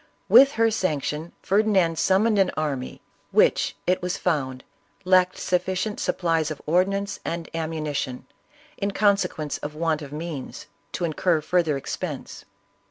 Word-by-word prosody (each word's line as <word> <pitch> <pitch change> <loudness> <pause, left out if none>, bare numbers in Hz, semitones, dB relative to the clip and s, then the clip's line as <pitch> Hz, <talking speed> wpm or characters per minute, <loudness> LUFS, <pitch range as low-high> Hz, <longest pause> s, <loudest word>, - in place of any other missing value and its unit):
With 275 +1 +7
her 225 0 +2
sanction 160 -5 -2
Ferdinand 190 -5 +2
summoned 205 +3 +3
an 190 - +4
army, 140 -5 -3 0.3
which, - - +3
it 185 +1 +1
was 180 0 -2
found, 130 -7 -1 0.4
lacked 185 0 +4
sufficient 185 +3 -1
supplies 165 -3 0
of 155 - -6
ordnance 195 +4 0
and 170 -1 -4
ammunition, 155 -5 -3 0.5
in 200 - -1
consequence 195 -7 0
of 150 +1 -6
want 160 -1 0
of 140 -2 -8
means, 155 -2 -6 0.3
to 175 - -1
incur 165 +1 +1
further 160 -2 +1
expense. 145 +1 -6
170 Hz, 130 wpm, -24 LUFS, 155-190 Hz, 0.5 s, With